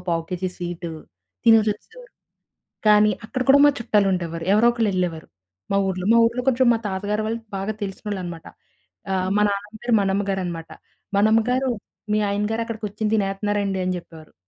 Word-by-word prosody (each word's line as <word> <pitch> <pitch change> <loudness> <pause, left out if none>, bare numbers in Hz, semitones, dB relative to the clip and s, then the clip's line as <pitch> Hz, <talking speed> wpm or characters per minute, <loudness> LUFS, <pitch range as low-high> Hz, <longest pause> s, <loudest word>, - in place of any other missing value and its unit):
పావు 165 -1 +1
KG 180 +1 -2
sweet 175 0 -5 0.6
తినేసొచ్చేసేవారు. 225 - +2 0.7
కానీ 210 0 +6
అక్కడ 255 +4 -2
కూడా 275 - +8
మా - - +7
చుట్టాలుండేవారు. 180 -7 0
ఎవరో 220 +3 +5
ఒకళ్ళు 230 -3 0
ఎళ్ళేవారు, 170 -3 -2 0.4
మా 195 - +2
ఊర్లో. 185 -1 -3
మా 235 - +6
ఊర్లో 235 +2 -2
కొంచెం 260 0 +3
మా 230 - 0
తాతగారు 205 +2 -2
వాళ్ళు 230 +1 -2 0.2
బాగా 195 +3 -2
తెలిసినోళ్ళనమాట. 190 -4 -5 0.7
ఆహ్, 185 -1 0
మా 210 - +3
నాన్నమ్మ 205 +2 -4
పేరు 240 -1 +1
మనెమ్మగారనమాట. 190 -4 -2 0.5
"మనెమ్మగారు, 225 +5 +3 0.4
మీ 210 - +3
ఆయనగారు 210 +3 -1
అక్కడ 230 -1 -6
కుర్చోని 210 +1 -2
తినేత్త‌న్నారండి" 200 -1 -1
అని 185 0 -1
చెప్పేవారు. 160 -2 -14
205 Hz, 145 wpm, -23 LUFS, 185-220 Hz, 0.7 s, కూడా